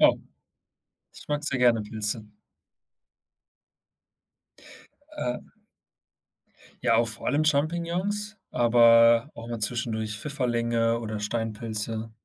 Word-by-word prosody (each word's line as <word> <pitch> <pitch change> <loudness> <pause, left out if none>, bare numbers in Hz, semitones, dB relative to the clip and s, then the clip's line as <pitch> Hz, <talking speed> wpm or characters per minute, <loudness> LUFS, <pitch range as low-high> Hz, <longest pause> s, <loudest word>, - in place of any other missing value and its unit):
Oh, - - +5 0.9
ich - - -13
mag 145 0 -1
sehr 135 -3 -1
gerne 120 -3 +3
Pilze. 105 +1 -3 2.9
Äh 125 - -2 1.4
Ja, - - +3
auch 115 0 +4
vor 110 -3 -3
allem 145 +4 +1
Champignons, 175 +8 0 0.2
aber 115 +1 +5
auch 115 +1 -9
mal 120 - -4
zwischendurch 110 -1 -2
Pfifferlinge 115 -4 0
oder 110 -2 -4
Steinpilze. 110 0 -3
115 Hz, 95 wpm, -26 LUFS, 110-140 Hz, 2.9 s, Oh